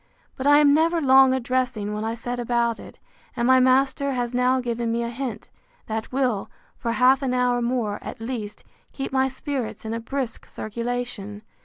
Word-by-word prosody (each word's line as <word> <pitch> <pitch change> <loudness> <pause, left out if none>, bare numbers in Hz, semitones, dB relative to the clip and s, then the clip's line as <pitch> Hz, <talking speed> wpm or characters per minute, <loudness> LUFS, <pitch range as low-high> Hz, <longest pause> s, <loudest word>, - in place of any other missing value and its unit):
But 265 - -2
I 290 0 +7
am 290 -1 +6
never 330 +3 +3
long 265 -2 +6
a 260 - +1
dressing, 245 -4 -1
when 210 +1 -3
I 225 +1 -2
set 245 +1 -4
about 235 -1 0
it; - - -12 0.4
and 235 - +1
my 260 +1 +6
master 270 +2 +2
has 245 -1 -2
now 250 +1 +2
given 235 -2 -2
me 235 +1 0
a 235 - -3
hint, 240 -2 -5 0.4
that 220 0 -4
will, 250 -6 0 0.3
for 230 -1 -1
half 255 +3 +4
an 255 -2 0
hour 245 -1 +2
more, 235 -4 -1
at - - -8
least, 225 -3 -5 0.3
keep 270 - -4
my 265 0 +2
spirits 265 -3 -5
in 220 - -3
a 230 - -2
brisk 255 +1 -4
circulation. 230 -2 -5
245 Hz, 190 wpm, -24 LUFS, 230-265 Hz, 0.4 s, I